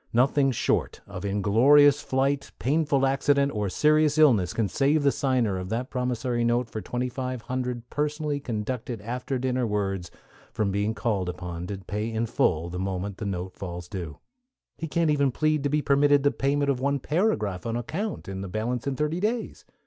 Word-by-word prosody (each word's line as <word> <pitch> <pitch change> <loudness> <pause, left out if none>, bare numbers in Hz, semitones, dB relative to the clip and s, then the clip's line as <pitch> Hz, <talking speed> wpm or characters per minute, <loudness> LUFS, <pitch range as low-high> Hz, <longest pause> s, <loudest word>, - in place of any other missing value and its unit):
Nothing 135 +3 +3
short 125 - 0
of - - -8
inglorious 130 +9 +5
flight, 135 +1 0
painful 145 0 +1
accident, 140 +1 +2
or 105 -4 -2
serious 150 +5 +3
illness, 120 - +5
can 110 -3 0
save 145 - +2
the 140 - +4
signer 125 -10 0
of 90 0 -6
that 120 +4 -3
promissory 125 -1 -1
note 120 +1 +1
for 110 - -4
twenty 125 +3 -2
five 125 -2 -4
hundred 125 -1 -3
personally 150 0 -1
conducted 120 -1 -4
after 125 +4 -3
dinner 125 -1 0
words 95 -4 -2 0.4
from 105 -2 -1
being 100 +3 0
called 100 -4 -1
upon 90 0 -6
to 100 - -4
pay 105 +4 -4
in 115 +1 -1
full 110 - +1
the 90 +1 -5
moment 95 +1 -3
the 110 - -5
note 90 -1 -4
falls 90 -2 -6
due. 85 -6 -6 0.6
He 165 - -5
can't 165 0 +1
even 140 -2 +2
plead 155 +3 +1
to 145 - 0
be 150 +1 +1
permitted 145 0 +4
the 145 - +4
payment 140 +2 +1
of 130 - -2
one 140 +2 +1
paragraph 140 - 0
on 115 - -2
account, 190 - -4
and 95 0 -5
the - - -5
balance 115 +6 -3
in 140 - -1
thirty 150 +4 -1
days. 225 +4 -2
125 Hz, 185 wpm, -26 LUFS, 105-140 Hz, 0.6 s, inglorious